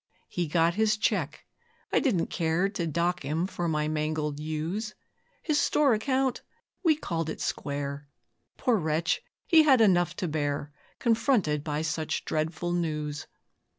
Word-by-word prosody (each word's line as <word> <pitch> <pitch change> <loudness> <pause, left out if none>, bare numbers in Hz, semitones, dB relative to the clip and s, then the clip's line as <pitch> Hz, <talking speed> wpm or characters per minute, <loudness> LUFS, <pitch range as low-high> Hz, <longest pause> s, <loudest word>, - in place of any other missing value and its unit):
He 175 -2 -2
got 165 +2 +3
his 215 +2 +2
cheque 180 -8 -1 0.5
I - - +5
didn't 205 - 0
care 165 +3 +1
To 180 -4 -3
dock 170 +2 0
him 155 +5 -1
for 175 -2 -3
my 150 -2 0
mangled 155 -1 -1
ewes; 160 +8 -3 0.5
His 305 -3 +2
store 290 -4 +3
account 260 +4 0 0.4
we 325 -3 +5
'called 165 - -3
it - - -5
square'. 140 0 -3 0.5
Poor 245 -4 +2
wretch! 160 -1 0 0.2
he 325 -2 +7
had 275 -5 +5
enough 180 -5 +4
to 180 - -2
bear, 145 -1 -2 0.3
Confronted 225 - +2
by 150 0 -2
such 160 0 -2
dreadful 160 +2 -2
news. 155 -3 -2
165 Hz, 145 wpm, -28 LUFS, 155-210 Hz, 0.5 s, he